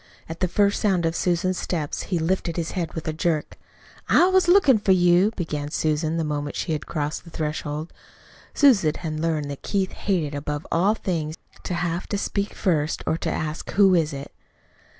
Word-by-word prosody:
At 165 +1 -7
the 185 - +1
first 200 +3 +2
sound 190 -5 +2
of 165 0 0
Susan's 180 +1 0
steps 155 -5 -3
he 180 - +1
lifted 170 0 -1
his 170 -1 -2
head 175 -3 -3
with 160 - -5
a 155 - -1
jerk. 160 -1 -1 0.5
"I - - +6
was 375 -1 +3
lookin' 345 - +6
for 195 -2 +3
you," 180 +2 +4
began 150 -5 -3
Susan 155 +1 0
the 165 - 0
moment 145 -1 -3
she 170 - -2
had 155 -2 -3
crossed 150 -1 -3
the 170 - -13
threshold. 155 0 -4 0.6
Susan 210 - +4
had 155 -2 -4
learned 155 -3 -1
that 140 - -7
Keith 195 -2 -1
hated 170 -7 -1
above 145 +1 -4
all 195 +6 +3
things 160 -6 -3 0.3
to 180 - -2
have 175 +1 -2
to 205 - -2
speak 200 +1 -2
first, 155 -5 0
or - - +1
to 165 - -3
ask, 155 0 -4
"Who 195 -2 +5
is 165 -3 +2
it?" 140 0 -7
165 Hz, 190 wpm, -24 LUFS, 155-185 Hz, 0.6 s, I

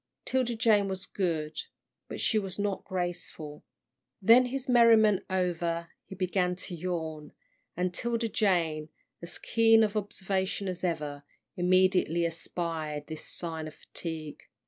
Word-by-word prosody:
'Tilda 255 -2 +1
Jane 215 -3 +3
was 190 0 -4
good, 160 -5 -2 0.5
but - - -6
she 220 - +3
was 190 -3 -5
not 205 -1 -1
graceful. 175 -5 -5 0.6
Then 230 +6 +7
his 270 +2 -4
merriment 225 -4 +5
over, 170 -2 -1 0.2
he 190 - -8
began 180 0 0
to 180 0 -6
yawn, 160 -3 -4 0.4
and 180 0 0
'Tilda 230 +4 -1
Jane, 165 -8 +1 0.3
as 170 +1 -4
keen 225 0 +4
of 210 0 0
observation 195 -1 -1
as 185 -1 -4
ever, 150 -5 -2 0.3
immediately 180 -2 +3
espied 165 -2 -3
this 155 0 -8
sign 160 -2 -2
of 155 - -10
fatigue. 160 -3 -6
180 Hz, 130 wpm, -29 LUFS, 165-205 Hz, 0.6 s, Then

